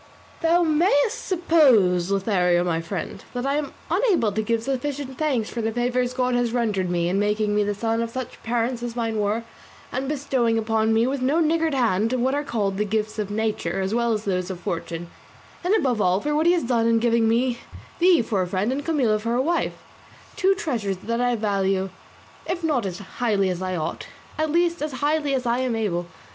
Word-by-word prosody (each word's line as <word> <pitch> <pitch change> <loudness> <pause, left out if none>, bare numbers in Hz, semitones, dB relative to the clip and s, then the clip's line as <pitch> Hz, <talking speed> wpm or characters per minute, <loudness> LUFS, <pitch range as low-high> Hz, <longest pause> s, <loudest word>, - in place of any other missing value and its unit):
"Thou 340 +1 +3
mayest 315 +3 +2
suppose, 255 - +4
Lothario 185 -3 +2
my 165 -2 0
friend, 175 +2 -5
that 245 +1 -2
I 275 - +1
am 300 -2 -3 0.2
unable 360 - +2
to 215 +2 -1
give 230 +1 -1
sufficient 270 +1 -3
thanks 265 -8 0
for 235 - -3
the 225 0 -1
favours 245 +1 0
God 250 -1 +1
has 245 -1 +1
rendered 210 -7 0
me 170 -1 0
in 190 +3 +1
making 210 0 +1
me 210 - +3
the 205 0 -1
son 225 +2 -1
of 230 - -2
such 255 +1 -6
parents 235 +1 -1
as 240 -1 -5
mine 225 -2 -1
were, 210 +3 0 0.5
and 265 +2 -2
bestowing 265 -6 0
upon 220 0 +1
me 225 +1 +3
with 265 +1 -1
no 275 +6 +2
niggard 320 -1 +1
hand 225 -2 +1
what 255 +1 +1
are 290 +1 0
called 205 -8 -1
the 210 - +1
gifts 215 +1 -2
of 205 -2 -2
nature 215 -1 -1
as 190 +2 -1
well 235 0 +1
as 215 -1 -2
those 185 -2 -1
of 185 -2 -5
fortune, 170 0 -4 0.6
and 370 +5 +3
above 255 - +1
all 185 0 +3
for 295 +7 -2
what 315 +2 +2
he 350 - +6
has 350 - +1
done 235 -2 +1
in 230 0 +4
giving 230 -1 +2
me 240 +1 +1 0.4
thee 345 -6 +5
for 210 -4 -1
a 180 - -1
friend 195 +6 -1
and 280 +2 -2
Camilla 260 -10 +1
for 230 +2 -1
a - - +1
wife 340 +4 0 0.6
two 390 -1 +3
treasures 225 - -2
that 230 +1 -1
I 245 0 +2
value, 195 -3 0 0.6
if 355 -1 -3
not 275 -10 +1
as 180 -2 -5
highly 200 -1 -1
as 180 0 -4
I 185 0 -2
ought, 155 -3 -4 0.3
at 310 0 +1
least 340 +1 +1
as 300 -2 -3
highly 290 +1 0
as 255 -1 -2
I 240 +1 +1
am 255 -3 0
able. 175 -6 -1
230 Hz, 210 wpm, -24 LUFS, 205-275 Hz, 0.6 s, he